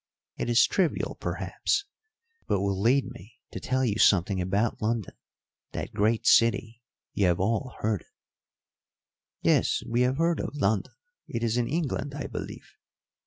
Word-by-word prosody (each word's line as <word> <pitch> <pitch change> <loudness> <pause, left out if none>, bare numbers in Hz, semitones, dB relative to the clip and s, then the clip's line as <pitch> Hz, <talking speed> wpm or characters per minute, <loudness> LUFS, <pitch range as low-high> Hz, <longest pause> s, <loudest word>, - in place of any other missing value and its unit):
It - - -3
is 120 0 +6
trivial, 180 -5 0
perhaps, 405 0 -1 0.6
but 100 - +1
will 100 -1 -1
lead 130 +5 +3
me 115 -2 -13 0.2
to - - -5
tell 130 0 0
you 105 -2 -1
something 95 0 +4
about 100 +5 0
London 110 -1 -1 0.6
that - - -5
great 110 +2 +1
city 115 0 +3 0.3
you 100 -3 +2
have 85 -1 +2
all 115 +6 -1
heard 105 -4 0
of." - - -23 1.4
"Yes, - - +2
we 120 +1 +1
have 125 +2 +2
heard 165 0 +1
of - - -4
London; 110 -8 0 0.3
it 115 0 -4
is 115 -1 +1
in 120 -1 +1
England, 145 -2 -2
I 145 - -4
believe. - - -7
115 Hz, 155 wpm, -27 LUFS, 100-130 Hz, 1.4 s, is